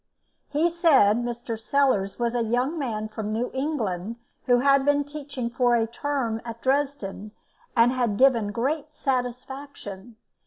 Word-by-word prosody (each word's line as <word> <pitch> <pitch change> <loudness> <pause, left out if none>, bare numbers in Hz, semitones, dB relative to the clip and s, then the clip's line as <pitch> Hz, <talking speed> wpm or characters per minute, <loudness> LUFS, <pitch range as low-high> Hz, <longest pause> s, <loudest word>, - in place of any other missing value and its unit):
He 315 +4 +2
said 285 - +5
Mr. 240 -1 -4
Sellars 225 -6 +1
was 235 -1 0
a 240 - +1
young 250 +8 0
man 215 -6 -2
from 215 -1 -5
New 230 +3 -1
England 230 - -2 0.3
who 245 -1 +5
had 275 0 +4
been 290 +1 +3
teaching 285 -4 -5
for 245 0 +3
a 225 -1 +2
term 235 -2 -2
at 230 -1 -8
Dresden, 260 -7 -1 0.4
and 230 +1 +6
had 240 -5 0
given 235 -5 +4
great 290 +7 -2
satisfaction. 250 -4 -4
245 Hz, 145 wpm, -25 LUFS, 225-280 Hz, 0.4 s, and